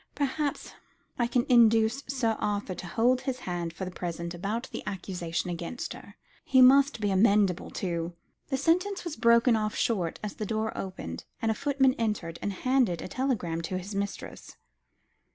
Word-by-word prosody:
Perhaps 285 +1 -2 0.5
I 240 - +2
can 245 0 +1
induce 230 +1 +4
Sir 250 -4 0
Arthur 205 -2 -1
to 180 0 -7
hold 245 +7 +2
his 255 -2 -3
hand 175 -2 -3
for 180 +3 -6
the 185 - -6
present 170 -1 -4
about 210 +8 -3
the - - -5
accusation 180 -3 -3
against 175 +8 -5
her. - - -13 0.3
He 260 - +3
must 275 +1 +6
be 205 -2 0
amenable 200 -2 +3
to 170 -2 -3 0.2
" - - -49
The 270 - 0
sentence 360 +7 +1
was 340 -3 -4
broken 235 +1 +5
off 215 0 -1
short, 185 -8 0
as 210 - -3
the 215 - -3
door 220 +1 -2
opened, 80 - -6
and 225 - +1
a - - +2
footman 270 +1 +2
entered 205 -7 -2
and 205 - -1
handed 240 -4 +1
a - - -5
telegram 185 -9 -1
to 185 +3 -3
his 190 +3 -6
mistress. 200 0 -5
215 Hz, 175 wpm, -28 LUFS, 180-255 Hz, 0.5 s, must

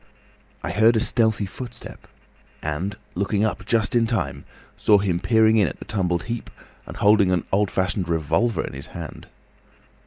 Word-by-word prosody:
I - - -2
heard 110 +3 +4
a - - +3
stealthy 110 -2 +2
footstep 120 +4 -9 0.6
and, 85 +7 -3 0.2
looking 100 +3 0
up 110 - -3
just 115 0 +1
in 115 -1 +3
time, 70 - -2 0.3
saw 105 - +4
him 95 -4 0
peering 110 +4 +4
in 100 -4 +4
at 65 - -6
the - - -10
tumbled 90 -4 -1
heap 120 0 -5 0.4
and - - -8
holding 105 -2 +4
an 90 -3 +1
old 100 0 +2
fashioned 95 -1 -1
revolver 85 +6 +1
in - - -8
his 70 +2 -8
hand. 85 -3 -8
100 Hz, 165 wpm, -23 LUFS, 85-110 Hz, 0.6 s, heard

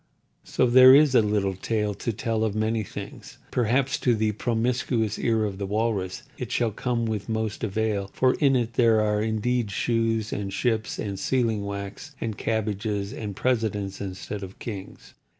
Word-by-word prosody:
So, - - +1
there 130 +2 +8
is 145 -2 +5
a 125 - +6
little 105 -2 0
tale 105 +1 -1
to 110 +4 -3
tell 115 0 -1
of 110 -2 -1
many 110 +1 0
things. 105 - -9
Perhaps 125 +3 +1
to 120 -2 +2
the 110 0 +1
promiscuous 115 0 0
ear 115 -2 +1
of 100 -2 -4
the 100 - -3
Walrus 105 -3 -1 0.2
it - - -5
shall 115 -2 +1
come 115 +2 -1
with 110 -1 -3
most 110 -1 -2
avail; 105 -2 -1
for 130 0 +3
in 140 -3 +3
it 120 -2 0
there 115 -2 +4
are 105 0 +1
indeed 110 +1 0
shoes 115 +1 0
and 100 -1 -3
ships 110 0 -1
and 100 -3 -4
sealing 115 -5 0
wax 100 +10 -6
and 110 -2 -3
cabbage 110 -2 -1
palms 100 -1 -2
and 105 -3 -5
presidents 105 -4 -1
instead 100 +1 -5
of 95 0 -8
kings. 100 -5 -8
110 Hz, 175 wpm, -25 LUFS, 105-120 Hz, 0.2 s, there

